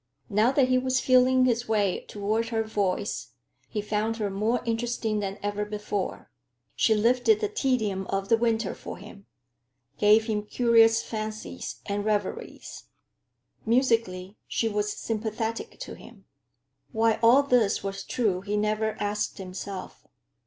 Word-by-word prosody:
Now 215 Hz, +5 st, +4 dB
that 265 Hz, -2 st, +3 dB
he 255 Hz, 0 st, +4 dB
was 255 Hz, 0 st, +1 dB
feeling 255 Hz, 0 st, +4 dB
his 240 Hz, -1 st, +1 dB
way 205 Hz, -4 st, +1 dB
toward 215 Hz, +3 st, -1 dB
her 225 Hz, -1 st, 0 dB
voice, 205 Hz, -2 st, -2 dB, 0.4 s
he 210 Hz, -2 st, -3 dB
found 215 Hz, +2 st, -1 dB
her 210 Hz, -3 st, -2 dB
more 215 Hz, +5 st, 0 dB
interesting 230 Hz, -2 st, -1 dB
than 195 Hz, 0 st, -3 dB
ever 205 Hz, 0 st, -1 dB
before. 210 Hz, -2 st, -4 dB, 0.4 s
She 220 Hz, -, +3 dB
lifted 245 Hz, -, +3 dB
the 425 Hz, -, 0 dB
tedium 245 Hz, -, -1 dB
of 195 Hz, 0 st, -2 dB
the 230 Hz, -, +5 dB
winter 225 Hz, -2 st, 0 dB
for -, -, -8 dB
him, 200 Hz, 0 st, -13 dB, 0.7 s
gave 215 Hz, +1 st, +5 dB
him 215 Hz, -2 st, -1 dB
curious 225 Hz, +1 st, +4 dB
fancies 215 Hz, -, -6 dB
and 205 Hz, 0 st, -2 dB
reveries. 205 Hz, -2 st, -3 dB, 0.8 s
Musically, 225 Hz, -6 st, +1 dB
she 225 Hz, -, 0 dB
was 210 Hz, -1 st, -1 dB
sympathetic 225 Hz, +1 st, -4 dB
to -, -, -6 dB
him. -, -, -14 dB, 0.7 s
Why 225 Hz, -1 st, +2 dB
all 240 Hz, +5 st, +6 dB
this 245 Hz, -7 st, +2 dB
was 195 Hz, 0 st, -4 dB
true, 205 Hz, -7 st, 0 dB
he 205 Hz, +2 st, -2 dB
never 215 Hz, +1 st, 0 dB
asked 205 Hz, +1 st, -2 dB
himself. 190 Hz, 0 st, -7 dB
220 Hz, 140 wpm, -27 LUFS, 205-235 Hz, 0.8 s, all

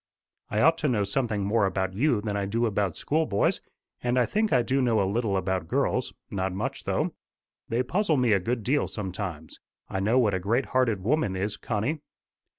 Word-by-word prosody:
"I 105 Hz, -, 0 dB
ought 165 Hz, +2 st, +4 dB
to 155 Hz, -, +1 dB
know 115 Hz, -6 st, +2 dB
something 105 Hz, 0 st, -1 dB
more 105 Hz, 0 st, +2 dB
about 95 Hz, 0 st, -1 dB
you 120 Hz, +1 st, +2 dB
than 105 Hz, -1 st, -3 dB
I 100 Hz, -1 st, -1 dB
do 115 Hz, +4 st, +1 dB
about 100 Hz, -6 st, 0 dB
schoolboys. 150 Hz, -9 st, +1 dB, 0.4 s
And 120 Hz, +1 st, 0 dB
I 125 Hz, -, +4 dB
think 215 Hz, -, 0 dB
I 125 Hz, -, +4 dB
do 135 Hz, +3 st, +1 dB
know 115 Hz, -4 st, +2 dB
a 100 Hz, -, +2 dB
little 105 Hz, -1 st, 0 dB
about 95 Hz, -2 st, -1 dB
girls -, -, 0 dB, 0.2 s
not 95 Hz, -1 st, -1 dB
much 95 Hz, -, -4 dB
though. -, -, 0 dB, 0.6 s
They 120 Hz, +3 st, +1 dB
puzzle 170 Hz, -, +1 dB
me 125 Hz, -3 st, +3 dB
a 100 Hz, -, +4 dB
good 115 Hz, +4 st, -2 dB
deal 140 Hz, +6 st, +1 dB
sometimes. 95 Hz, -6 st, -5 dB, 0.3 s
I 95 Hz, -, -2 dB
know 110 Hz, +6 st, +2 dB
what 115 Hz, -5 st, +3 dB
a 95 Hz, -, 0 dB
great 115 Hz, +8 st, +1 dB
hearted 115 Hz, -7 st, +2 dB
woman 130 Hz, -4 st, +1 dB
is, 100 Hz, +2 st, -2 dB
Connie." 115 Hz, +10 st, -2 dB
110 Hz, 200 wpm, -27 LUFS, 95-125 Hz, 0.6 s, ought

